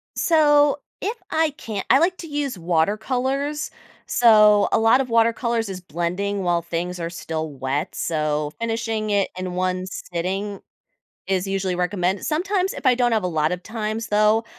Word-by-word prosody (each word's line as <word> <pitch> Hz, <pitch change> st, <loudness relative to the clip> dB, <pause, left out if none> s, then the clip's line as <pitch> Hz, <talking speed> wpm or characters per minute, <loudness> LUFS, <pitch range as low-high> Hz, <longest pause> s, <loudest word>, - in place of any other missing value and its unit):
So, 295 Hz, -4 st, +4 dB, 0.2 s
if 435 Hz, +4 st, -2 dB
I 315 Hz, -1 st, +1 dB
can't 220 Hz, -9 st, -6 dB
I 265 Hz, -, +6 dB
like 355 Hz, +3 st, +2 dB
to 335 Hz, -, -8 dB
use 290 Hz, -6 st, -3 dB
watercolors, 245 Hz, -, -1 dB, 0.4 s
so, 210 Hz, -3 st, +5 dB
a -, -, +3 dB
lot 225 Hz, +4 st, +5 dB
of 255 Hz, -, -4 dB
watercolors 230 Hz, 0 st, +1 dB
is 185 Hz, -1 st, -6 dB
blending 180 Hz, +4 st, -2 dB
while 175 Hz, -1 st, +1 dB
things 175 Hz, +2 st, -4 dB
are 165 Hz, 0 st, -3 dB
still 160 Hz, -2 st, -4 dB
wet, 135 Hz, +5 st, -3 dB
so, 150 Hz, -2 st, -1 dB
finishing 225 Hz, -2 st, -2 dB
it 200 Hz, -1 st, +1 dB
in 185 Hz, -1 st, -4 dB
1 185 Hz, 0 st, -1 dB
sitting 190 Hz, +3 st, -4 dB, 0.7 s
is 190 Hz, 0 st, 0 dB
usually 195 Hz, -1 st, -1 dB
recommend 180 Hz, +1 st, -1 dB
sometimes 370 Hz, +4 st, 0 dB
if -, -, -9 dB
I 255 Hz, -2 st, +5 dB
don't 245 Hz, -1 st, +2 dB
have 220 Hz, -4 st, +1 dB
a -, -, 0 dB
lot 155 Hz, -1 st, 0 dB
of 180 Hz, -, -3 dB
times, 220 Hz, +1 st, -4 dB
though, 215 Hz, +1 st, +3 dB
210 Hz, 165 wpm, -22 LUFS, 180-245 Hz, 0.7 s, I